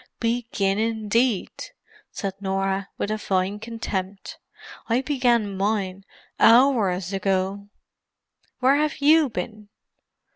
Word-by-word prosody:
"Begin, 230 -4 -1
indeed!" 225 0 0 0.6
said 195 -3 -4
Norah, 195 0 -1
with 205 - -2
a 215 - -2
fine 190 +1 -1
contempt. 205 -4 -5 0.5
"I 235 +3 +2
began 245 -7 +1
mine 195 -1 -2 0.3
hours 220 -7 +4
ago. 195 +1 -1 0.9
Where 265 +3 +4
have 300 0 0
you 305 0 +4
been?" 210 +1 -6
210 Hz, 100 wpm, -24 LUFS, 195-235 Hz, 0.9 s, hours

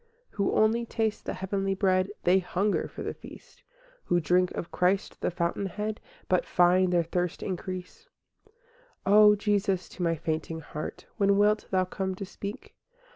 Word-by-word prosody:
VI - - -24
Who 200 -1 +1
only 225 +2 +3
taste 220 -2 -2
the - - -3
heavenly 195 0 -1
bread, 185 -1 +2
They 180 +2 +5
hunger 190 +3 0
for - - -8
the - - -3
feast; - - -14 0.4
Who 175 - +2
drink 180 +3 +2
of 170 - -5
Christ, 180 +2 0
the - - +1
Fountainhead, 195 +5 -2 0.3
But 185 - +2
find 180 +1 +3
their 175 -1 +3
thirst 175 +1 -2
increase. 185 - -6 0.4
VII 430 - -28 0.5
O 210 +1 +7
Jesus, 200 -2 0
to - - -10
my 165 -1 +2
fainting 160 0 -3
heart 150 0 -7
When 200 -2 +3
wilt 210 +1 +3
Thou 185 -1 +2
come 190 +1 -3
to 195 - -6
speak? 200 +4 -8
190 Hz, 165 wpm, -28 LUFS, 180-205 Hz, 0.5 s, O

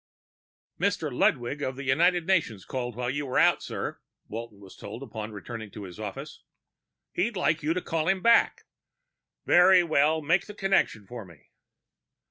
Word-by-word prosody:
"Mr. 160 -9 -1
Ludwig 125 +4 +1
of 130 -2 -2
the 140 - -7
United 170 +6 +2
Nations 155 - 0
called 125 -3 -4
while 125 +1 -2
you 145 +1 -3
were 130 - -1
out, - - +4
sir," - - -5 0.3
Walton 110 -2 -7
was 95 -2 -14
told 110 +6 -8
upon 110 -4 -6
returning 110 +1 -7
to 105 +1 -9
his 90 +1 -10
office. 105 -3 -7 0.7
"He'd 205 +4 -1
like 155 -2 +1
you 155 +2 0
to 180 - -2
call 160 -1 -1
him 190 0 +1
back." 235 0 +4 0.8
"Very 180 +1 +6
well. 155 -1 +2
Make 175 +5 +2
the 210 - -9
connection 195 - +1
for 120 +1 -8
me." 85 -6 -18
140 Hz, 165 wpm, -27 LUFS, 110-175 Hz, 0.8 s, Very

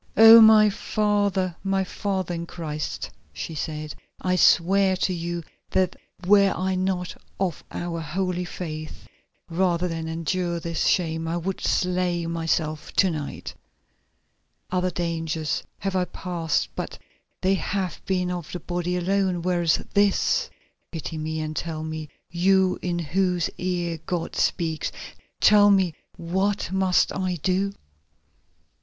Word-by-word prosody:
"Oh! 225 +1 +11
my 220 -1 +8
father, 205 -4 0
my 195 0 +1
father 190 -1 -3
in 170 0 -4
Christ," 155 -4 -5 0.2
she 80 - -6
said, 155 0 -4 0.3
"I 185 0 0
swear 190 +2 +4
to 185 - 0
you 170 0 -3 0.3
that 185 -1 +1 0.3
were 200 +1 +6
I 190 +1 0
not 185 -1 -1 0.2
of 185 -4 -1
our 170 -1 -4
holy 180 +3 -2
faith, 155 -3 -7 0.4
rather 175 0 +1
than 165 -1 -4
endure 170 +2 -1
this 165 0 -1
shame 165 -2 +1
I 165 +1 -1
would 185 +2 -3
slay 180 -2 0
myself 165 -2 -1
to 190 -2 +3
night! 150 -3 -5 1.2
Other 185 0 +1
dangers 165 -3 -2 0.2
have 195 -1 -3
I 185 -1 +2
passed, 170 -4 -2
but - - -5 0.4
they 190 +1 +3
have 190 -1 -2
been 180 -1 0
of 175 -4 -5
the 180 - -4
body 175 +1 -2
alone, 185 -1 0
whereas 175 -2 +1
this——. 205 - +2 0.4
Pity 160 -1 -5
me 160 +1 -3
and 155 0 -4
tell 160 -1 -3
me, 160 -1 -5 0.2
you 185 +2 +3
in 175 -1 -1
whose 175 +1 0
ear 175 -2 -2
God 175 -2 -2
speaks, 160 -2 0 0.5
tell 205 -1 +6
me, 190 -4 +3 0.2
what 190 +4 -1
must 190 -1 +2
I 185 -1 -1
do?" 190 +2 +1
180 Hz, 135 wpm, -25 LUFS, 165-190 Hz, 1.2 s, Oh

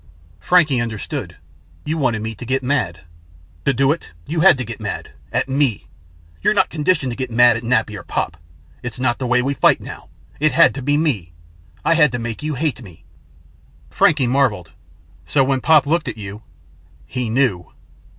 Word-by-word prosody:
Frankie 155 -8 +3
understood. 110 -3 -5 0.5
"You 155 - -1
wanted 120 -8 0
me 110 0 -4
to 110 - -10
get 130 +2 -1
mad!" 85 - -1 0.6
"To 140 - +4
do 135 +2 +2
it, 165 - -4 0.2
you 160 +2 -3
had 175 -3 +6
to 130 - -4
get 115 0 -7
mad 105 -3 -5 0.2
at - - 0
me. 135 -5 0 0.6
You're 215 - +2
not - - +2
conditioned 150 -4 0
to - - -5
get 130 0 -4
mad 120 0 +5
at 115 - -3
Nappy 110 -3 0
or 100 - -7
Pop. 80 - -3 0.5
It's 120 0 -6
not 120 -2 0
the 130 - -2
way 125 +1 +2
we 140 +2 0
fight - - +3
now. - - -10 0.3
It 155 +1 +2
had 165 - +5
to 135 - -6
be 145 +3 +1
me. 110 - -1 0.5
I - - +4
had 150 -4 +4
to - - -1
make 120 0 -5
you 150 -1 -3
hate 145 -2 -2
me." 90 -8 -14 0.9
Frankie 145 -4 +3
marveled. 120 -10 +1 0.6
"So 140 - +3
when 135 -1 0
Pop 155 -1 +5
looked 155 +1 0
at 120 - -4
you 100 0 -8 0.3
" - - -29
"He 125 -3 -1
knew." 115 -7 0
130 Hz, 190 wpm, -20 LUFS, 115-145 Hz, 0.9 s, had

